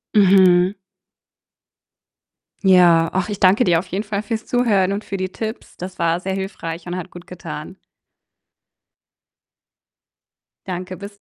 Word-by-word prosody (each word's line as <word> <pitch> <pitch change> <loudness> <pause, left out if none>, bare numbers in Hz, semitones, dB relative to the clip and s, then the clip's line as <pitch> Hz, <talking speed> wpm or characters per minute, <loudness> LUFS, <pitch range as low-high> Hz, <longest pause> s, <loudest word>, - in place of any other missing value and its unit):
Mhm. 185 -2 +5 1.9
Ja. 175 -3 +5
Ach, 190 +2 -1
ich 205 - -4
danke 195 +6 +4
dir 170 -3 +3
auf 180 - -7
jeden 195 +3 -3
Fall 205 -1 -3
fürs 220 +1 -4
Zuhören 205 -6 +2
und 205 +2 -4
für 195 - -5
die 185 0 -3
Tipps. 220 0 -7
Das 185 +1 -8
war 170 0 +1
sehr 190 +1 -3
hilfreich 180 -3 -5
und 180 +1 -4
hat 185 0 -6
gutgetan. 175 0 -9 2.9
Danke, 185 0 -5
bis 200 0 -10
185 Hz, 125 wpm, -20 LUFS, 180-200 Hz, 2.9 s, Mhm